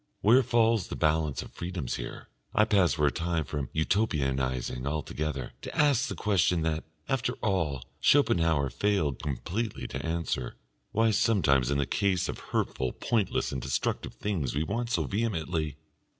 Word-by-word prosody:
Where 120 Hz, +6 st, +6 dB
falls 115 Hz, -4 st, +2 dB
the -, -, -5 dB
balance 75 Hz, -3 st, +1 dB
of -, -, -12 dB
freedoms 85 Hz, -7 st, -4 dB
here? -, -, -7 dB, 0.3 s
I 110 Hz, -, +5 dB
pass 100 Hz, -5 st, +3 dB
for 75 Hz, -3 st, +1 dB
a 70 Hz, -, +3 dB
time 85 Hz, -1 st, -1 dB
from 75 Hz, -3 st, -4 dB
Utopianising 65 Hz, -, 0 dB
altogether, 75 Hz, -3 st, -3 dB
to -, -, -7 dB
ask 140 Hz, -3 st, +4 dB
the -, -, -4 dB
question 90 Hz, -5 st, +2 dB
that, 80 Hz, -1 st, -1 dB, 0.2 s
after 130 Hz, -2 st, 0 dB
all, 80 Hz, -, -1 dB
Schopenhauer 80 Hz, -, +3 dB
failed 80 Hz, -5 st, 0 dB
completely 75 Hz, -, -3 dB
to -, -, -5 dB
answer, 80 Hz, -6 st, -2 dB, 0.4 s
why 115 Hz, +1 st, +3 dB
sometimes 75 Hz, -, +3 dB
in 70 Hz, -, +1 dB
the 70 Hz, -, +1 dB
case 95 Hz, +3 st, +1 dB
of -, -, -4 dB
hurtful, 65 Hz, -1 st, -1 dB
pointless, 110 Hz, -5 st, 0 dB
and 65 Hz, -, -3 dB
destructive 65 Hz, +1 st, -2 dB
things 85 Hz, -11 st, -2 dB
we 75 Hz, -, +1 dB
want 115 Hz, +7 st, -2 dB
so 120 Hz, -, +1 dB
vehemently.... 85 Hz, -, -1 dB
80 Hz, 155 wpm, -29 LUFS, 70-105 Hz, 0.4 s, Where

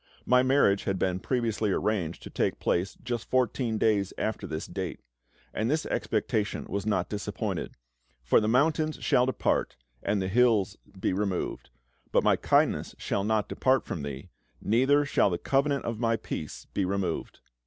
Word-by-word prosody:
My 125 Hz, 0 st, +5 dB
marriage 130 Hz, -7 st, +3 dB
had 95 Hz, -1 st, 0 dB
been 95 Hz, 0 st, 0 dB
previously 115 Hz, -2 st, 0 dB
arranged 95 Hz, -6 st, -1 dB
to -, -, -9 dB
take -, -, 0 dB
place 90 Hz, +3 st, 0 dB
just 120 Hz, -2 st, -4 dB
fourteen 125 Hz, -2 st, +1 dB
days 105 Hz, -3 st, +2 dB
after 110 Hz, -2 st, -2 dB
this 80 Hz, -1 st, -4 dB
date. 90 Hz, -2 st, -5 dB, 0.5 s
And 110 Hz, +2 st, -1 dB
this 155 Hz, +2 st, 0 dB
expectation 105 Hz, -1 st, -1 dB
was 100 Hz, +1 st, -3 dB
not 95 Hz, -4 st, +1 dB
disappointed; 105 Hz, -1 st, -4 dB, 0.5 s
for -, -, +4 dB
"the 105 Hz, -, 0 dB
mountains 155 Hz, +6 st, +2 dB
shall 125 Hz, +1 st, +3 dB
depart, 130 Hz, -, 0 dB, 0.3 s
and 100 Hz, 0 st, 0 dB
the 95 Hz, -, -1 dB
hills 105 Hz, -2 st, +3 dB, 0.2 s
be -, -, 0 dB
removed, 95 Hz, -2 st, -2 dB, 0.4 s
but -, -, +3 dB
My -, -, +4 dB
kindness -, -, +1 dB
shall 100 Hz, -, -1 dB
not 110 Hz, 0 st, +1 dB
depart 130 Hz, -1 st, +2 dB
from 80 Hz, -, -4 dB
thee, 70 Hz, -1 st, -7 dB, 0.3 s
neither 135 Hz, +6 st, +3 dB
shall 140 Hz, -, +3 dB
the 90 Hz, -, -1 dB
covenant 140 Hz, +4 st, +1 dB
of 115 Hz, -2 st, -3 dB
My 115 Hz, -1 st, +2 dB
peace 80 Hz, -8 st, -6 dB
be 100 Hz, -, 0 dB
removed." 95 Hz, -2 st, -2 dB
105 Hz, 165 wpm, -28 LUFS, 95-125 Hz, 0.5 s, My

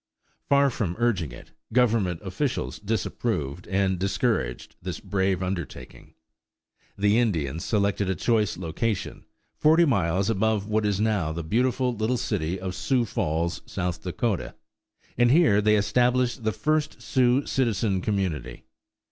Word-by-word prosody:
Far 140 Hz, -1 st, +4 dB
from 95 Hz, -8 st, -2 dB
urging 110 Hz, -10 st, 0 dB
it, -, -, -12 dB, 0.2 s
Government 110 Hz, -8 st, +2 dB
officials 100 Hz, +8 st, -2 dB
disapproved 100 Hz, -, -2 dB
and 95 Hz, -1 st, +1 dB
discouraged 95 Hz, -, -1 dB
this -, -, -5 dB
brave 95 Hz, -2 st, 0 dB
undertaking. 90 Hz, -4 st, -6 dB, 0.8 s
The 105 Hz, +3 st, +3 dB
Indians 85 Hz, -, -1 dB
selected 100 Hz, -2 st, 0 dB
a 95 Hz, -, 0 dB
choice 110 Hz, -5 st, +1 dB
location, 95 Hz, +4 st, -3 dB, 0.3 s
forty 160 Hz, +3 st, +5 dB
miles 95 Hz, -, +1 dB
above 110 Hz, -1 st, +1 dB
what 110 Hz, 0 st, +1 dB
is 100 Hz, -1 st, 0 dB
now 105 Hz, -7 st, +1 dB
the 85 Hz, +1 st, -4 dB
beautiful 125 Hz, +6 st, +1 dB
little 110 Hz, +3 st, 0 dB
city 95 Hz, -5 st, -2 dB
of 95 Hz, 0 st, -4 dB
Sioux 125 Hz, +5 st, +1 dB
Falls, 85 Hz, -4 st, -1 dB
South 90 Hz, -3 st, -3 dB
Dakota, 95 Hz, +2 st, -2 dB, 0.6 s
and 120 Hz, 0 st, +5 dB
here 135 Hz, -8 st, +5 dB
they 105 Hz, +1 st, +4 dB
established 125 Hz, +3 st, +1 dB
the 110 Hz, -, +1 dB
first 155 Hz, +4 st, -1 dB
Sioux 130 Hz, +1 st, +2 dB
citizen 110 Hz, -6 st, 0 dB
community. 90 Hz, -, -2 dB
105 Hz, 130 wpm, -26 LUFS, 90-120 Hz, 0.8 s, forty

